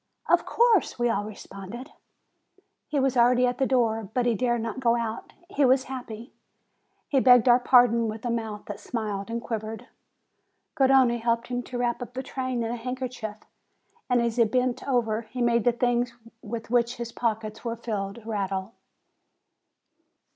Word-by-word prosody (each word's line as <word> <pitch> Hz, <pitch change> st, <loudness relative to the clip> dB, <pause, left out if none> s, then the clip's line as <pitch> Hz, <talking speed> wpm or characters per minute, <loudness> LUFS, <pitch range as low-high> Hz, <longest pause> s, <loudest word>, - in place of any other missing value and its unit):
"Of -, -, +3 dB
course!" 465 Hz, -4 st, +3 dB
we 240 Hz, -1 st, +1 dB
all 205 Hz, -2 st, -1 dB
responded. 215 Hz, +5 st, -9 dB, 1.0 s
He 295 Hz, -, -1 dB
was 270 Hz, -1 st, +1 dB
already 245 Hz, +1 st, +4 dB
at 245 Hz, +2 st, -1 dB
the 265 Hz, -, +2 dB
door, 225 Hz, -5 st, +1 dB
but 250 Hz, -1 st, +2 dB
he 240 Hz, -, +3 dB
dared 240 Hz, +1 st, 0 dB
not 230 Hz, +2 st, -4 dB
go 235 Hz, -2 st, +3 dB
out. 230 Hz, -1 st, -4 dB
He 295 Hz, -6 st, 0 dB
was 260 Hz, 0 st, +4 dB
happy! 245 Hz, -2 st, -8 dB, 0.7 s
He 275 Hz, -, +2 dB
begged 250 Hz, -1 st, +6 dB
our 245 Hz, 0 st, +7 dB
pardon 245 Hz, -2 st, +4 dB
with 220 Hz, +2 st, -6 dB
a 240 Hz, -, 0 dB
mouth 220 Hz, -3 st, -4 dB
that 205 Hz, -, -7 dB
smiled 210 Hz, -4 st, -4 dB
and 235 Hz, +1 st, -3 dB
quivered. 220 Hz, -1 st, -5 dB, 0.8 s
Garrone 265 Hz, -4 st, +4 dB
helped 230 Hz, +1 st, 0 dB
him 245 Hz, 0 st, -2 dB
to 245 Hz, 0 st, -7 dB
wrap 240 Hz, 0 st, -1 dB
up 245 Hz, +1 st, -8 dB
the 260 Hz, -, -3 dB
train 255 Hz, -2 st, -3 dB
in 225 Hz, -, -2 dB
a 240 Hz, -, -3 dB
handkerchief, 250 Hz, -3 st, -5 dB, 0.7 s
and 245 Hz, -1 st, +3 dB
as 235 Hz, 0 st, -1 dB
he 235 Hz, -, +6 dB
bent 250 Hz, +3 st, -1 dB
over, 230 Hz, -4 st, +1 dB
he 235 Hz, +3 st, -9 dB
made 235 Hz, -2 st, +2 dB
the 245 Hz, -, +5 dB
things 240 Hz, 0 st, 0 dB, 0.3 s
with 230 Hz, +1 st, -6 dB
which 240 Hz, 0 st, +2 dB
his 235 Hz, -1 st, -6 dB
pockets 220 Hz, -2 st, -3 dB
were 230 Hz, -1 st, -2 dB
filled 215 Hz, -2 st, -5 dB
rattle. 195 Hz, -1 st, -3 dB
235 Hz, 170 wpm, -26 LUFS, 225-250 Hz, 1.0 s, our